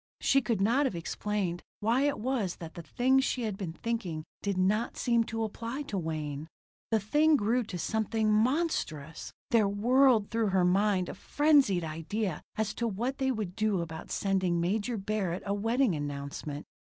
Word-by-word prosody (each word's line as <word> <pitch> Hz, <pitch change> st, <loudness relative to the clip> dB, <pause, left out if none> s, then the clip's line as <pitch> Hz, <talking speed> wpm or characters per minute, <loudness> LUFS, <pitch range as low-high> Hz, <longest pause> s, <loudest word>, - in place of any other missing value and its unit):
She 275 Hz, -, +3 dB
could 220 Hz, -4 st, -1 dB
not 250 Hz, +8 st, +3 dB
have 200 Hz, -, -4 dB
explained 180 Hz, +1 st, -2 dB, 0.2 s
why 235 Hz, +6 st, +2 dB
it 285 Hz, -, 0 dB
was 225 Hz, -6 st, -1 dB
that 165 Hz, -1 st, -9 dB
the 170 Hz, -, -7 dB
things 260 Hz, +10 st, +2 dB
she 255 Hz, -2 st, -1 dB
had 215 Hz, -3 st, -2 dB
been 190 Hz, -4 st, -4 dB
thinking 185 Hz, -7 st, -3 dB, 0.2 s
did 200 Hz, -2 st, -1 dB
not 205 Hz, +5 st, +1 dB
seem 235 Hz, -2 st, +2 dB
to 225 Hz, -1 st, -3 dB
apply 230 Hz, +6 st, -4 dB
to 240 Hz, -8 st, -4 dB
Wayne. 155 Hz, -2 st, -4 dB, 0.4 s
The 225 Hz, -, +3 dB
thing 300 Hz, +10 st, +3 dB
grew 235 Hz, +1 st, +2 dB
to 190 Hz, -4 st, -5 dB
something 220 Hz, +3 st, 0 dB
monstrous. 215 Hz, -, 0 dB, 0.2 s
There 220 Hz, -3 st, +4 dB
whirled 235 Hz, +1 st, +3 dB
through 225 Hz, -1 st, +1 dB
her 190 Hz, -2 st, +3 dB
mind 190 Hz, 0 st, +2 dB
a -, -, -5 dB
frenzied 285 Hz, -, +3 dB
idea 165 Hz, +4 st, -3 dB
as 215 Hz, -1 st, -1 dB
to 235 Hz, -, -1 dB
what 235 Hz, +7 st, -2 dB
they 265 Hz, 0 st, +2 dB
would 210 Hz, -7 st, -3 dB
do 215 Hz, -3 st, +1 dB
about 160 Hz, -1 st, -7 dB
sending 190 Hz, -3 st, +1 dB
Major 205 Hz, +7 st, 0 dB
Barrett 195 Hz, -3 st, -2 dB
a 200 Hz, -, 0 dB
wedding 225 Hz, +2 st, +2 dB
announcement. 145 Hz, 0 st, -5 dB
210 Hz, 175 wpm, -30 LUFS, 180-235 Hz, 0.4 s, There